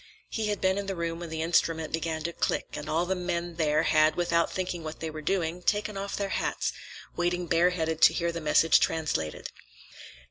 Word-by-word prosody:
He 220 -2 -1
had 210 -1 -1
been 190 +1 +2
in 200 - -5
the 195 - -2
room 165 -1 -3
when 170 -1 -6
the 160 0 -3
instrument 165 -1 +1
began 160 -1 -2
to 170 +1 -3
click, - - -1
and 150 +1 -6
all 165 +3 +1
the 190 - 0
men 175 -2 -3
there 155 -1 +2
had, 155 0 +4
without 170 -1 +1
thinking 180 -2 -3
what 155 0 -6
they 160 -1 -4
were 155 0 -7
doing, 175 0 -1
taken 210 +2 0
off 195 0 -4
their 200 -1 -2
hats, - - -1 0.4
waiting 175 0 0
bareheaded 165 -1 +1
to - - +8
hear 170 -1 0
the 170 0 -5
message 160 +1 +5
translated. 150 - -1
170 Hz, 205 wpm, -28 LUFS, 160-180 Hz, 0.4 s, to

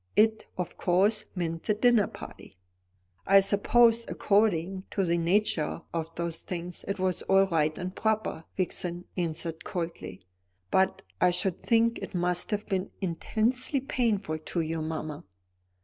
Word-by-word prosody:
"It," 220 0 +3
of 180 -1 -4
course, 205 +4 +2
meant 165 -2 -2
the 210 - +2
dinner 235 -2 +4
party. 95 - -11 0.7
"I 195 +1 +8
suppose, 230 +4 +4
according 195 -3 +1
to 195 - 0
the 170 0 +1
nature 170 -3 0
of 165 -1 -2
such 170 -1 -2
things, 175 0 -6
it 200 - -2
was 185 -2 0
all 195 0 +4
right 155 -4 0
and 185 0 -5
proper," 220 -7 -1
Vixen 180 -1 -2
answered 165 -2 -3
coldly; 165 - -5 0.5
"but 190 0 +2 0.2
I - - +6
should 180 0 0
think 230 0 +2
it - - -7
must 175 0 +1
have 210 -1 -2
been 190 -1 -2
intensely 225 - 0
painful 215 -11 -1
to 165 +2 -2
you, 160 0 -2
mamma." 155 -1 -4
185 Hz, 145 wpm, -28 LUFS, 170-210 Hz, 0.7 s, I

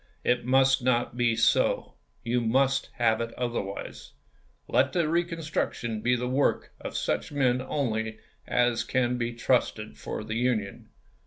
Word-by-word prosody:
It 125 0 +1
must 130 +1 +4
not 120 -1 +1
be 120 -2 +2
so. - - +2 0.3
You 120 +1 0
must 135 +4 +2
have 115 -2 +2
it 115 0 -3
otherwise. 115 -5 -4 0.5
Let - - +2
the 170 -3 +1
reconstruction 160 - -2
be 125 +2 +2
the 125 0 -2
work 135 +3 0
of - - -5
such - - -1
men 130 -3 +2
only 110 -6 -2 0.3
as 120 -1 +2
can 125 -1 0
be 120 0 -1
trusted 115 -3 0
for - - -5
the 110 +1 -3
Union. 115 -5 -1
125 Hz, 145 wpm, -27 LUFS, 115-130 Hz, 0.5 s, must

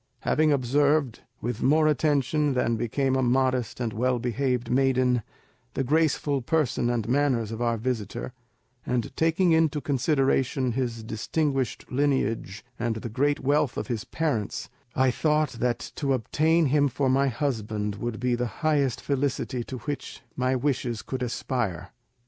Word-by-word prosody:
Having 155 0 +2
observed, 140 0 +2 0.2
with 120 -1 -3
more 155 +3 +4
attention 150 -1 +1
than 120 -2 +1
became 130 +4 0
a 130 - +2
modest 130 -1 +1
and 115 -3 -2
well 125 +3 +1
behaved 125 0 -1
maiden, 130 -2 +3 0.5
the 135 - 0
graceful 145 -1 +1
person 130 -3 +1
and 120 -3 -1
manners 125 -4 +1
of 115 +1 -5
our 115 -1 +1
visitor, 110 - -3 0.5
and 125 -3 -2
taking 165 +2 +2
into 160 -2 +3
consideration 135 -2 +1
his 120 -2 -2
distinguished 135 +4 -1
lineage 125 -7 0
and 115 -1 -1
the 110 +1 -5
great 145 +6 +1
wealth 145 0 +1
of - - -4
his 115 -4 -2
parents, 140 -11 -2 0.2
I 130 -1 +3
thought 155 +3 +1
that 120 0 -1
to 140 -2 +1
obtain 155 +7 +2
him 145 -1 +4
for 135 +1 -1
my 135 +2 +3
husband 110 -7 -2
would 115 +1 -4
be 125 0 +1
the 120 0 0 0.2
highest 140 -5 +2
felicity 135 -3 -1
to 130 - -6
which 145 0 -6
my 130 0 +1
wishes 125 -4 -1
could 130 0 -4
aspire. 120 -6 -2
130 Hz, 150 wpm, -26 LUFS, 120-145 Hz, 0.5 s, more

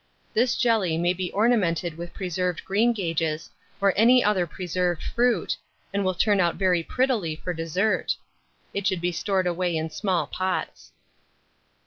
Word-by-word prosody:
This 245 +3 +2
jelly 215 -9 +2
may 175 +2 +2
be 185 0 -4
ornamented 180 -8 +1
with 170 +1 -7
preserved 180 -1 -2
greengages, 175 -7 0 0.3
or 200 -1 +3
any 245 +4 +6
other 190 -4 +2
preserved 180 0 -2
fruit, 235 -6 +1 0.4
and 200 0 0
will 185 -1 0
turn 205 +2 +3
out 175 -2 +2
very 180 -2 +2
prettily 220 -6 0
for 180 +3 -4
dessert. 170 +6 0 0.6
It 200 -1 -1
should 190 - +1
be 175 +1 0
stored 190 +2 0
away 175 -1 0
in 160 0 -3
small 190 -2 0
pots. 185 0 -3
185 Hz, 145 wpm, -25 LUFS, 170-205 Hz, 0.6 s, any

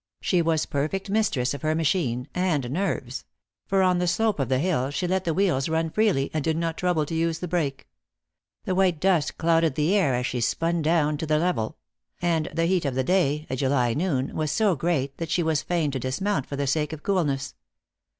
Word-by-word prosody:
She 180 -3 +1
was 160 -2 +1
perfect 190 +8 -2
mistress 150 - +1
of 140 - -6
her 155 0 0
machine 145 -6 0
and 155 -9 0
nerves; 190 +7 -2 0.4
for 195 -2 +2
on 180 -1 +3
the 180 - 0
slope 210 +2 +1
of 135 - -1
the 130 - +2
hill 140 -4 0
she 145 +6 -2
let 185 +1 0
the 165 - +1
wheels 175 -8 +1
run 160 0 0
freely, 200 -11 +1
and 155 -2 -1
did 160 +1 0
not 165 -1 -1
trouble 175 -4 0
to 155 - -6
use 165 0 0
the 180 - -5
brake. 155 -6 -2 0.8
The 185 - -1
white 185 -4 +2
dust 180 -4 +1
clouded 165 -3 +2
the 155 +5 +1
air 160 -11 +3
as 125 0 -1
she 125 -1 -2
spun 165 +7 0
down 155 -1 +2
to 160 - -4
the 155 0 +2
level; 160 -10 -1 0.4
and 165 -3 0
the 165 - 0
heat 180 0 +1
of 135 -2 -1
the 130 - +1
day 155 -2 +1
a 130 - -3
July 130 -3 +1
noon 145 -4 -1
was 155 -2 -1
so 200 +3 +2
great 140 -3 -1
that 165 -1 -4
she 170 +1 +1
was 160 -2 +1
fain 165 -5 0
to 135 - -3
dismount 135 - -1
for 140 - -5
the 140 0 -1
sake 150 +2 0
of 155 - -8
coolness. 150 -9 0
160 Hz, 220 wpm, -25 LUFS, 140-180 Hz, 0.8 s, on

